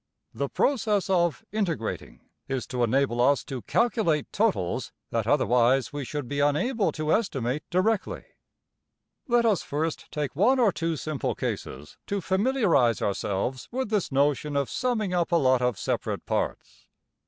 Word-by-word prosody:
The 140 Hz, +4 st, -2 dB
process 210 Hz, -8 st, +1 dB
of 175 Hz, +2 st, +1 dB
``\emph{integrating}'' 170 Hz, -, -3 dB, 0.3 s
is 135 Hz, -2 st, -2 dB
to 125 Hz, -1 st, -2 dB
enable 120 Hz, 0 st, +1 dB
us 140 Hz, +3 st, +3 dB
to 130 Hz, -3 st, -6 dB
calculate 215 Hz, -, +1 dB
totals 195 Hz, -, 0 dB, 0.2 s
that 115 Hz, -2 st, -1 dB
otherwise 130 Hz, -1 st, +3 dB
we 145 Hz, -1 st, -3 dB
should 145 Hz, 0 st, -5 dB
be 145 Hz, +2 st, -3 dB
unable 165 Hz, -, +1 dB
to 155 Hz, 0 st, 0 dB
estimate 140 Hz, -, -1 dB
directly. 190 Hz, +3 st, 0 dB, 1.0 s
Let 240 Hz, -1 st, +3 dB
us 210 Hz, -7 st, +3 dB
first 155 Hz, +2 st, -3 dB
take 145 Hz, -3 st, -3 dB
one 230 Hz, -, +4 dB
or 230 Hz, -5 st, +4 dB
two 165 Hz, -2 st, -2 dB
simple 155 Hz, -1 st, -3 dB
cases 70 Hz, +3 st, -5 dB
to 200 Hz, -, -1 dB
familiarize 190 Hz, -, +2 dB
ourselves 100 Hz, +5 st, -2 dB
with 255 Hz, -2 st, -3 dB
this 210 Hz, -8 st, 0 dB
notion 145 Hz, +1 st, +1 dB
of 140 Hz, -2 st, 0 dB
summing 225 Hz, -7 st, -1 dB
up 175 Hz, -1 st, 0 dB
a -, -, +4 dB
lot 130 Hz, -5 st, +3 dB
of 125 Hz, -4 st, +1 dB
separate -, -, -2 dB
parts. -, -, -3 dB
150 Hz, 150 wpm, -26 LUFS, 130-205 Hz, 1.0 s, one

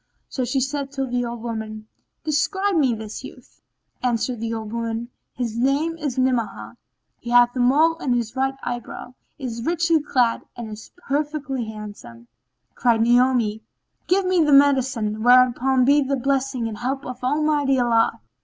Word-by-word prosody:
So 260 Hz, -, -2 dB
she 265 Hz, +2 st, 0 dB
said 275 Hz, +1 st, -2 dB
to 270 Hz, -1 st, -2 dB
the 245 Hz, -1 st, -1 dB
old 235 Hz, -1 st, -6 dB
woman, 220 Hz, -2 st, -5 dB, 0.4 s
"Describe 355 Hz, +7 st, 0 dB
to 345 Hz, -, +2 dB
me 260 Hz, -5 st, +2 dB
this 220 Hz, -1 st, -7 dB
youth." -, -, -13 dB, 0.4 s
Answered 245 Hz, -1 st, -1 dB
the 230 Hz, 0 st, -3 dB
old 220 Hz, -1 st, -5 dB
woman, 230 Hz, 0 st, -3 dB, 0.3 s
"His 235 Hz, -3 st, -3 dB
name 280 Hz, +7 st, +1 dB
is 285 Hz, -4 st, -3 dB
Ni'amah, 225 Hz, -, -1 dB, 0.4 s
he 235 Hz, -, -8 dB
hath 245 Hz, +1 st, +5 dB
a -, -, -2 dB
mole 300 Hz, +7 st, +4 dB
on 260 Hz, -7 st, 0 dB
his 235 Hz, -2 st, -2 dB
right 270 Hz, +1 st, 0 dB
eyebrow, 245 Hz, 0 st, -6 dB, 0.2 s
is 240 Hz, -5 st, -5 dB
richly 335 Hz, +1 st, +2 dB
clad 245 Hz, -5 st, +1 dB, 0.2 s
and 230 Hz, -2 st, -6 dB
is 215 Hz, 0 st, -10 dB, 0.2 s
perfectly 285 Hz, -3 st, -2 dB
handsome." 205 Hz, -, -10 dB, 0.5 s
Cried 235 Hz, -3 st, +2 dB
Naomi, 240 Hz, -3 st, +2 dB, 0.5 s
"Give 375 Hz, +2 st, +2 dB
me 365 Hz, -2 st, +3 dB
the 300 Hz, -, +2 dB
medicine, 260 Hz, -6 st, +3 dB
whereon 255 Hz, +1 st, +4 dB
be 285 Hz, +2 st, +5 dB
the 275 Hz, 0 st, 0 dB
blessing 265 Hz, -2 st, -1 dB
and 215 Hz, -2 st, -6 dB
help 270 Hz, +3 st, -3 dB
of 250 Hz, 0 st, -8 dB
Almighty 290 Hz, 0 st, +1 dB
Allah!" 235 Hz, -2 st, +2 dB
250 Hz, 165 wpm, -22 LUFS, 230-275 Hz, 0.5 s, hath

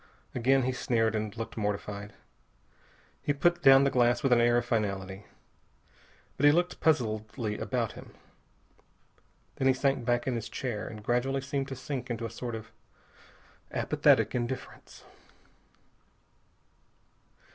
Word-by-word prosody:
Again 130 Hz, +2 st, +3 dB
he 130 Hz, -, 0 dB
sneered, 115 Hz, -3 st, 0 dB
and 110 Hz, 0 st, -3 dB
looked 115 Hz, -, -5 dB
mortified. 105 Hz, -1 st, -3 dB, 1.1 s
He 145 Hz, -, 0 dB
put 175 Hz, +5 st, +2 dB
down 135 Hz, 0 st, +7 dB
the 140 Hz, -, +2 dB
glass 120 Hz, -1 st, +2 dB
with 135 Hz, -2 st, +4 dB
an 120 Hz, -, +4 dB
air 120 Hz, 0 st, +4 dB
of 120 Hz, -, 0 dB
finality. 100 Hz, -4 st, -2 dB, 1.1 s
But 145 Hz, -, +5 dB
he -, -, +8 dB
looked 175 Hz, +3 st, 0 dB
puzzledly 110 Hz, -5 st, 0 dB
about 120 Hz, -4 st, -1 dB
him. -, -, -13 dB, 1.4 s
Then 135 Hz, -, +1 dB
he 130 Hz, -, +4 dB
sank 135 Hz, -1 st, +1 dB
back 120 Hz, 0 st, 0 dB
in 130 Hz, -, 0 dB
his 115 Hz, -1 st, -4 dB
chair 120 Hz, -5 st, -4 dB
and 105 Hz, -1 st, -9 dB
gradually 130 Hz, +4 st, 0 dB
seemed 135 Hz, 0 st, -3 dB
to 135 Hz, -, -6 dB
sink 130 Hz, 0 st, -5 dB
into 115 Hz, -1 st, -3 dB
a 115 Hz, -, -5 dB
sort 120 Hz, 0 st, -5 dB
of 110 Hz, -, -9 dB, 1.0 s
apathetic -, -, +2 dB
indifference. 125 Hz, +1 st, -5 dB
120 Hz, 135 wpm, -29 LUFS, 110-135 Hz, 1.4 s, he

